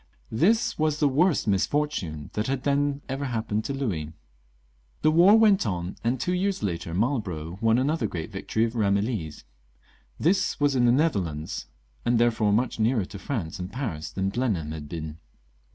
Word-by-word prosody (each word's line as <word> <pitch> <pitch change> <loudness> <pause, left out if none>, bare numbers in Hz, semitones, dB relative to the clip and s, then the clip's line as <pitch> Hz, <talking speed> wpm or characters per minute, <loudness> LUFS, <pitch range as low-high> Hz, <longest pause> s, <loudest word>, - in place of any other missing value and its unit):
This 195 - +2
was 155 -1 +1
the 150 - +4
worst 150 +1 +2
misfortune 95 - -1
that 105 +1 -1
had 135 -1 -2
then 145 0 +1
ever 135 +1 -3
happened 110 -4 -2
to 140 - -2
Louis. 90 - -3 0.9
The 155 - +5
war 180 +7 +7
went 210 - +4
on, 90 -1 -3
and 120 +2 0
two 180 - 0
years 190 - -1
later 85 -3 -3
Marlborough 95 - -2
won 115 0 +4
another 135 -2 +1
great 85 -5 -5
victory 110 +1 -1
at 115 - -2
Eamillies. 100 -6 -1 0.8
This 185 +4 +1
was 145 -1 +2
in 125 -1 +3
the 120 - +5
Nether 150 -2 +3
lands, 80 -3 -5 0.4
and 120 0 +2
therefore 115 -3 +3
much 115 +3 0
nearer 110 -2 +2
to 100 - -9
France 95 - -4
and 90 +2 -5
Paris 110 - -4
thaii 95 0 -2
Blenheim 100 -11 -1
had 75 -2 -7
been. 80 -1 -6
115 Hz, 170 wpm, -26 LUFS, 90-140 Hz, 0.9 s, war